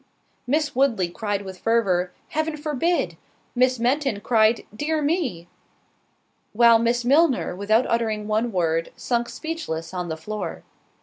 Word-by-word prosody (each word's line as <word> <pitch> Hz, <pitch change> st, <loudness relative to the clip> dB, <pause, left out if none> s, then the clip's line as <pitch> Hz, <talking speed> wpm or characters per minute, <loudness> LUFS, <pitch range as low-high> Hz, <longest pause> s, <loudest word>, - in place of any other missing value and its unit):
Miss 295 Hz, +2 st, 0 dB
Woodley 235 Hz, -10 st, +2 dB
cried 205 Hz, +2 st, -3 dB
with 190 Hz, -1 st, -9 dB
fervour, 190 Hz, -6 st, +1 dB, 0.2 s
"Heaven 315 Hz, 0 st, -2 dB
forbid!" 305 Hz, +3 st, -1 dB, 0.4 s
Miss 255 Hz, 0 st, +3 dB
Fenton 250 Hz, -1 st, 0 dB
cried, 225 Hz, 0 st, +3 dB
"dear 310 Hz, +6 st, -1 dB
me!" 285 Hz, -, -1 dB, 1.1 s
While 230 Hz, +1 st, +6 dB
Miss 235 Hz, +1 st, +1 dB
Milner, 280 Hz, -, +3 dB
without 215 Hz, +5 st, +2 dB
uttering 220 Hz, -2 st, -1 dB
one 220 Hz, +2 st, 0 dB
word, 165 Hz, -3 st, 0 dB
sunk 240 Hz, -2 st, -1 dB
speechless 190 Hz, -, -5 dB
on 180 Hz, -2 st, -3 dB
the 160 Hz, -, -3 dB
floor. 210 Hz, +6 st, -5 dB
230 Hz, 130 wpm, -23 LUFS, 200-280 Hz, 1.1 s, While